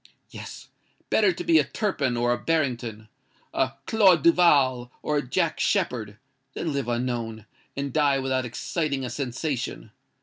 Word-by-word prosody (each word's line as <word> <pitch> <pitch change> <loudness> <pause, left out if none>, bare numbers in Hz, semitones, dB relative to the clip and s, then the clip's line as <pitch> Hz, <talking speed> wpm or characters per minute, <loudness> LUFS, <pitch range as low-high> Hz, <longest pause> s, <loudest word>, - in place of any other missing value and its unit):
Yes:—better 390 - -2
to 355 - -6
be 335 -2 +5
a - - +4
Turpin 140 - -1
or 120 0 +2
a - - -1
Barrington—a 125 -3 -3
Claude 190 -8 +4
du 170 - +7
Val 130 -8 +3
or 150 - 0
a - - +2
Jack 125 - -1
Sheppard, 110 -4 0 0.4
than 160 -3 -2
live 140 -3 -2
unknown, 120 -3 -3 0.3
and 140 -1 -3
die 145 -3 +3
without 130 -1 0
exciting 140 +3 -2
a 125 - -5
sensation. 130 0 -4
130 Hz, 140 wpm, -25 LUFS, 120-155 Hz, 0.4 s, du